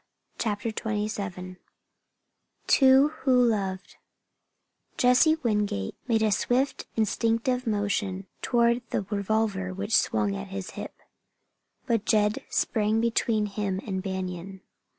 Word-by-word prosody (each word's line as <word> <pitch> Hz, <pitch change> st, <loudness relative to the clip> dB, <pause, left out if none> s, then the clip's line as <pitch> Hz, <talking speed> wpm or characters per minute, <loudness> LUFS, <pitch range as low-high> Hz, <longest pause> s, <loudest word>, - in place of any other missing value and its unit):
CHAPTER 210 Hz, 0 st, -1 dB
XXVII 205 Hz, -4 st, -4 dB, 1.1 s
TWO 270 Hz, +1 st, +6 dB
WHO 305 Hz, -3 st, -2 dB
LOVED 205 Hz, -6 st, +1 dB, 1.0 s
Jesse 250 Hz, +6 st, +5 dB
Wingate 210 Hz, -, 0 dB
made 225 Hz, -2 st, +2 dB
a 215 Hz, -, +2 dB
swift 250 Hz, +7 st, 0 dB
instinctive 230 Hz, +3 st, 0 dB
motion 205 Hz, -2 st, -1 dB, 0.2 s
toward 235 Hz, -1 st, +2 dB
the -, -, -1 dB
revolver 200 Hz, -2 st, -1 dB
which 205 Hz, +3 st, 0 dB
swung 200 Hz, -1 st, +1 dB
at 200 Hz, 0 st, -6 dB
his 195 Hz, -1 st, -6 dB
hip. -, -, -8 dB, 0.9 s
But 230 Hz, -5 st, 0 dB
Jed 210 Hz, -1 st, +2 dB
sprang 215 Hz, -1 st, +1 dB
between 225 Hz, -2 st, +1 dB
him 200 Hz, -2 st, -2 dB
and 190 Hz, -3 st, -3 dB
Banion. 190 Hz, 0 st, -5 dB
210 Hz, 110 wpm, -27 LUFS, 195-230 Hz, 1.1 s, TWO